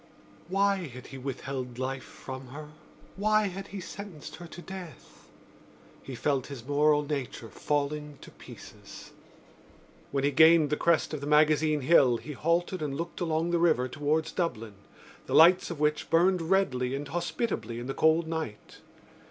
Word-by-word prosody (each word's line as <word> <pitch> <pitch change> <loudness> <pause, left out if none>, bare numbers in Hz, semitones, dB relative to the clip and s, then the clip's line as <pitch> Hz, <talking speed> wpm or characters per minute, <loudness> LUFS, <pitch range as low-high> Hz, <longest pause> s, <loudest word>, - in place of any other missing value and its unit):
Why 200 +2 +2
had 125 -1 -11
he 135 - -7
withheld 130 -1 -5
life 130 +1 -3
from 130 0 -9
her? 150 +4 -9 0.5
Why 215 0 +2
had 195 +2 -7
he 200 - -7
sentenced 185 -4 -9
her 175 - -10
to 170 - -11
death? 185 -2 -11 0.7
He 135 - -8
felt 135 0 -1
his 130 -5 -9
moral 150 +1 +3
nature 140 -6 -5
falling 150 +1 -2
to - - -12
pieces. - - -13 1.0
When 135 -1 -1
he 140 - +2
gained 160 -1 +6
the - - +3
crest 165 0 +1
of 150 - -4
the 145 - -5
Magazine 150 0 +3
Hill 130 -4 +5
he 150 - -9
halted 170 +5 0
and 140 -2 -3
looked 170 +3 -5
along 165 0 0
the 170 - +2
river 160 -7 +3
towards 155 +4 -1
Dublin, 115 - -3 0.5
the - - -1
lights 175 +3 +6
of 170 -4 -6
which 150 0 0
burned 180 +2 +3
redly 135 -10 +1
and 145 +1 -5
hospitably 170 - -3
in 120 - -6
the 135 - -3
cold 160 +2 +3
night. 160 -10 -6
150 Hz, 160 wpm, -28 LUFS, 135-170 Hz, 1.0 s, gained